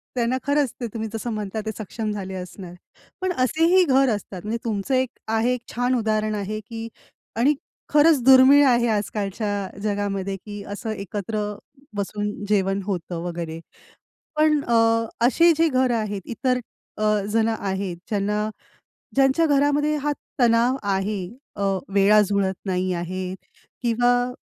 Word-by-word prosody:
त्यांना 245 +1 +1
खरंच 285 -2 +1
ते 240 - -1
तुम्ही 220 -1 -3
जसं 225 +1 -3
म्हणताय 215 0 -3
ते 220 - -2
सक्षम 215 +1 -4
झाले 195 -2 -5
असणार. 180 0 -8 0.5
पण 370 -1 0
असेही 330 +6 +3
घर 270 -4 +3
असतात 190 -2 -8
म्हणजे 220 +2 -2
तुमचं 215 +3 -2
एक 255 -1 +1 0.2
आहे 225 +3 +1
एक 250 - -4
छान 245 +1 +1
उदाहरण 215 -2 0
आहे 210 +1 -3
की 225 +1 -7 0.5
आणि 260 +6 +3 0.4
खरंच 300 -1 +5
दुर्मिळ 265 +2 +8
आहे 240 -1 +3
आजकालच्या 205 -1 -2
जगामध्ये 200 -2 -2
की 205 -1 -7
असं 220 +2 -5
एकत्र 205 +1 -4 0.5
बसून 205 +1 -2 0.2
जेवण 195 -1 +1
होतं 175 -3 -3
वगैरे. 170 -2 -5 0.8
पण 305 -1 +4
अ, 235 - 0 0.5
असे 335 +7 +5
जे 330 0 +4
घरं 255 -3 +2
आहेत 210 -3 -2
इतर 250 +2 -1 0.4
अ, 215 - -2 0.3
जणं 225 0 +2
आहेत 190 -2 -3
ज्यांना 210 +1 0 0.7
ज्यांच्या 270 +4 +4
घरामध्ये 290 +1 +2
हा 295 0 -1 0.3
तणाव 240 +2 +4
आहे. 195 0 -1 0.4
अ, 200 - -3 0.3
वेळा 205 +2 +6
जुळत 200 -2 +1
नाही 185 0 0
आहे 185 +2 -4 0.5
किंवा 245 +1 +2
220 Hz, 140 wpm, -23 LUFS, 200-255 Hz, 0.8 s, दुर्मिळ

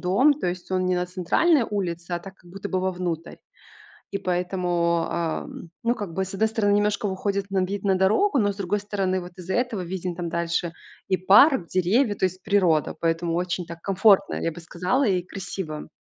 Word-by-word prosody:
дом, 220 +12 +4
то 275 -10 -2
есть 180 +1 -6
он 185 -1 +1
не 180 0 +1
на 180 - -1
центральной 200 - +2
улице, 175 -4 -3
а 175 - 0
так, 190 +2 -11
как 175 - -19
будто 195 +2 -6
бы 185 - 0
вовнутрь, 180 -3 -3 0.8
и 200 - -1
поэтому, 175 -2 0
а, 165 -2 -1
м, 165 - -10
ну, 235 +1 +2
как 200 -8 -6
бы, 190 - 0
с 190 - -8
одной 215 +3 +1
стороны 215 -2 +1
немножко 205 0 +1
выходит 200 0 -2
на 190 -1 +1
вид 195 +1 -4
на 195 -2 +2
дорогу, 245 - +3
но 205 -3 +2
с - - -15
другой 200 +1 -1
стороны, 195 -2 -1
вот 180 0 -9
из-за 185 +1 -5
этого 245 -5 0
виден 180 0 -4
там 170 0 -4
дальше 170 0 -1 0.4
и 190 - +2
парк, 200 - +6
деревья, 205 +7 +2
то 200 - -2
есть 185 0 -2
природа, 175 -7 +2
поэтому 165 0 0
очень 175 0 -2
так 170 0 -9
комфортно, 195 0 +4
я 165 - -1
бы 170 - -10
сказала, 180 +10 0
и 190 -6 +1
красиво. 180 -4 -6
185 Hz, 205 wpm, -24 LUFS, 175-200 Hz, 0.8 s, парк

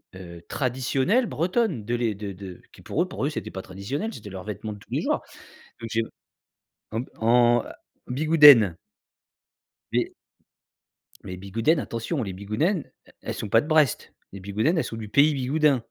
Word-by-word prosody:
heu, 85 -2 -10
traditionnelle 135 - +1
bretonne, 180 - 0
de 120 - -2
les 115 -4 0
de 100 -1 -6
de 95 -1 -10
qui - - -15
pour 160 - -2
eux - - -6
pour 155 - -5
eux, 145 - +1
c'était 150 - -5
pas 95 - -6
traditionnel, 100 - -4
c'était 105 - -9
leurs 95 -1 -7
vêtements 105 0 -5
de 105 - -12
tous - - -20
les - - 0
jours, - - 0 0.6
donc 115 -1 -6
j'ai 115 0 +1 0.9
en 110 +2 -1 0.2
en 120 +1 +4 0.4
bigoudène 140 - +7 1.2
et - - 0 1.1
Les 90 - -6
bigoudènes, 115 - +1
attention, 115 +4 -3
les 95 - -5
bigoudènes, 110 - -1 0.3
elles - - -4
sont 105 - -5
pas 115 +3 +5
de 150 - -8
Brest. 155 -5 +2 0.2
Les 100 - -9
bigoudènes, 105 - 0
elles 160 - +2
sont 115 - -6
du 110 -2 -7
pays 145 +7 +5
Bigoudin. 140 -1 +1
120 Hz, 170 wpm, -25 LUFS, 100-150 Hz, 1.2 s, bigoudène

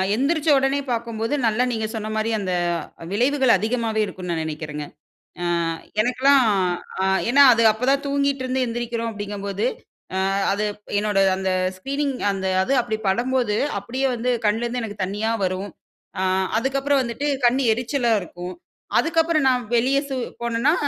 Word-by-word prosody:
எந்தரிச்சோடனே 280 0 +2
பார்க்கும்போது, 230 0 -2
நல்லா 225 +3 +2
நீங்க 220 -2 -2
சொன்ன 215 -1 -4
மாதிரி 220 +1 0
அந்த, 185 -3 -2 0.6
விளைவுகள் 260 +4 +2
அதிகமாவே 220 +2 -1
இருக்கும்னு 180 -3 -6
நான் 165 - -1
நினைக்கிறேங்க. 150 -1 -5 0.6
ஆ - - -1 0.6
எனக்கெலாம் 255 +3 +4 0.6
ஆ - - +2 0.2
ஏனா 280 +3 +7
அது 230 0 +2
அப்போ 220 +3 -6
தான் 280 +1 +1
தூங்கிகிட்டுருந்து 275 -2 0
எந்திரிக்கிறோம் 235 0 -3
அப்படிங்கும்போது, 205 - -4 0.5
ஆ - - +1 0.3
அது 200 +2 0 0.4
என்னோட 210 -1 +1 0.2
அந்த 190 0 -1 0.3
ஸ்க்ரீனிங் 275 +6 -2 0.2
அந்த 190 -1 -4 0.2
அது 265 - 0
அப்படி 220 -2 -3
படும்போது, 240 +1 +1 0.2
அப்படியே 250 +7 -3
வந்து 245 +2 -1 0.2
கண்ணுலேருந்து 235 +3 0
எனக்கு 205 -2 -6
தண்ணியா 210 +4 -1
வரும். 185 +2 -3 0.5
ஆ - - 0 0.4
அதுக்கப்புறம் 275 +2 +1
வந்துட்டு 240 +4 -3 0.2
கண் 250 +3 +3
எரிச்சலா 240 +1 0
இருக்கும். 180 +1 -8 0.4
அதுக்கப்புறம் 325 -2 +2
சு - - +4
நான் 250 -1 +1
வெளியே 260 +4 +3 0.4
போனேன்னா, 235 +5 +1
235 Hz, 140 wpm, -22 LUFS, 210-270 Hz, 0.6 s, ஏனா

